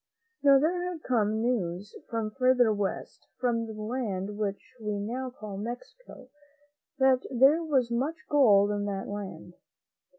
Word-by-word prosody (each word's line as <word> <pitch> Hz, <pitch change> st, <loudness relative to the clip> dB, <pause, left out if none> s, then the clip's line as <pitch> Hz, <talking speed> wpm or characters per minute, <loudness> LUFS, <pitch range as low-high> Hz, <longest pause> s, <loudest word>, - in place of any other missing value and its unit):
Now, 280 Hz, -1 st, +7 dB
there 335 Hz, +6 st, +1 dB
had 325 Hz, -3 st, -8 dB
come 220 Hz, -3 st, +1 dB
news 205 Hz, -5 st, -2 dB
from 225 Hz, -2 st, -2 dB
further 250 Hz, -2 st, +3 dB
west, 200 Hz, -2 st, -4 dB
from 230 Hz, -2 st, 0 dB
the 220 Hz, -, -7 dB
land 210 Hz, -4 st, -3 dB
which 205 Hz, -1 st, -4 dB
we 210 Hz, -1 st, -2 dB
now 250 Hz, +5 st, -3 dB
call 215 Hz, -5 st, -8 dB
Mexico, 245 Hz, -, -8 dB, 0.7 s
that 265 Hz, -1 st, +4 dB
there 270 Hz, +6 st, +5 dB
was 265 Hz, -7 st, +1 dB
much 270 Hz, +7 st, 0 dB
gold 210 Hz, -8 st, +5 dB
in 205 Hz, 0 st, -1 dB
that 195 Hz, -1 st, -3 dB
land. 190 Hz, -4 st, -7 dB
230 Hz, 140 wpm, -28 LUFS, 205-260 Hz, 0.7 s, Now